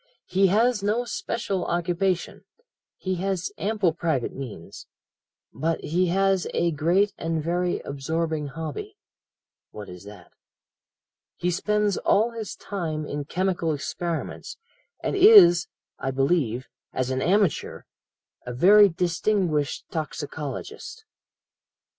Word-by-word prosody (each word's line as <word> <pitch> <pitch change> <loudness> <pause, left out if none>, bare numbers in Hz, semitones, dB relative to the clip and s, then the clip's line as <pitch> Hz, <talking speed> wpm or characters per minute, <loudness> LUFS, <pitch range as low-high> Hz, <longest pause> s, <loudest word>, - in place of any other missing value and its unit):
"He 195 +1 +3
has 220 +3 +2
no 215 +5 0
special 200 -4 -3
occupation. 175 +1 -1 0.5
He 185 -1 -3
has 190 0 -2
ample 205 -5 +1
private 160 -7 -1
means. 120 -11 -9 0.7
But 165 +1 -1
he 180 +4 +1
has 195 +1 +2
a 170 - +2
great 175 +7 +2
and 165 -1 -2
very 175 +2 -1
absorbing 155 +2 -2
hobby.' 165 - -6 0.7
"'What 105 -2 -9
is 90 0 -10
that?' 100 -4 -13 1.0
"'He 180 - -1
spends 210 +2 +1
all 225 +4 +2
his 225 -3 -6
time 160 -6 -4
in 145 -1 -4
chemical 175 -1 -1
experiments, 165 +3 -4 0.5
and - - -1
is, 175 - +8 0.3
I 135 - -2
believe, 135 -3 0 0.2
as 130 0 -2
an 130 0 -1
amateur, 195 -1 +1 0.6
a 125 -1 -6
very 200 +8 +7
distinguished 175 -3 0
toxicologist.'" 160 - -6
175 Hz, 110 wpm, -25 LUFS, 150-195 Hz, 1.0 s, is